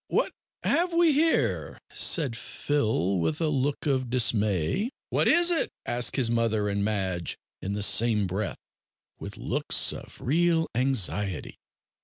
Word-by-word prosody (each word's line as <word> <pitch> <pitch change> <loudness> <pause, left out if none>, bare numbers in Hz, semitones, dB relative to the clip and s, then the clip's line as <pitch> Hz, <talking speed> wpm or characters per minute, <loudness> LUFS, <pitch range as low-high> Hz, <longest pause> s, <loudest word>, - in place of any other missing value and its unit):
what - - 0 0.3
have 350 +2 +1
we 335 -1 +4
here?" 320 +3 +1 0.2
said 140 -9 +2
Phil, 110 - -1
with 150 - -1
a 160 -2 0
look 140 +1 -1
of 130 -4 0
dismay. 110 - +1 0.2
"What - - +2
is 345 +2 +4
it?" 335 - +1 0.2
asked 120 0 -1
his 125 -4 +1
mother 115 -3 0
and 100 0 -1
Madge 95 -5 -2 0.2
in 100 - -4
the 105 0 -1
same 110 -1 +3
breath, 95 +3 -3 0.6
with - - -8
looks - - +1
of - - -11
real 165 +4 +1
anxiety. 105 -7 -1
120 Hz, 140 wpm, -26 LUFS, 100-155 Hz, 0.6 s, we